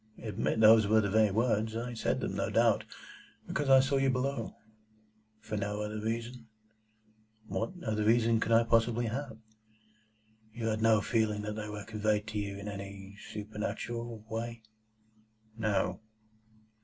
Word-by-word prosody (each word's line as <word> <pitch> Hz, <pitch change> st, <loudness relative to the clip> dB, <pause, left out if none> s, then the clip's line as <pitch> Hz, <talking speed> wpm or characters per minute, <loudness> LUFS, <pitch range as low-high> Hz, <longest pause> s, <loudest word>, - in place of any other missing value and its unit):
"Admit 110 Hz, 0 st, -2 dB
those 110 Hz, -1 st, +7 dB
were 110 Hz, +1 st, +5 dB
the 100 Hz, -2 st, 0 dB
very 110 Hz, 0 st, +4 dB
words. 110 Hz, +1 st, +1 dB
I 120 Hz, +1 st, -3 dB
said 115 Hz, -, -1 dB
them, -, -, -3 dB
no -, -, -1 dB
doubt, -, -, +3 dB, 0.6 s
because 145 Hz, -2 st, -1 dB
I 135 Hz, -1 st, +8 dB
saw 135 Hz, +1 st, +1 dB
you 135 Hz, 0 st, +2 dB
below." 130 Hz, -2 st, -2 dB, 0.8 s
"For 110 Hz, -1 st, -5 dB
no 105 Hz, +1 st, -2 dB
other 105 Hz, 0 st, -4 dB
reason?" 115 Hz, +2 st, -4 dB, 1.0 s
"What 185 Hz, -, -3 dB
other 110 Hz, -1 st, 0 dB
reason 115 Hz, +1 st, +3 dB
could 115 Hz, -, -1 dB
I 115 Hz, +1 st, +6 dB
possibly 115 Hz, +1 st, +2 dB
have?" 115 Hz, 0 st, -4 dB, 1.1 s
"You 115 Hz, 0 st, -3 dB
had 110 Hz, 0 st, -1 dB
no 110 Hz, -2 st, +4 dB
feeling 110 Hz, -2 st, 0 dB
that 105 Hz, 0 st, -3 dB
they 105 Hz, -1 st, -5 dB
were 105 Hz, -1 st, -6 dB
conveyed 105 Hz, -1 st, 0 dB
to 110 Hz, -1 st, -3 dB
you 100 Hz, -1 st, -4 dB
in 100 Hz, +1 st, -7 dB
any 100 Hz, -1 st, -7 dB, 0.2 s
supernatural 110 Hz, +2 st, -5 dB
way?" 115 Hz, 0 st, -5 dB, 0.9 s
"No." 105 Hz, -5 st, 0 dB
110 Hz, 150 wpm, -31 LUFS, 105-115 Hz, 1.1 s, I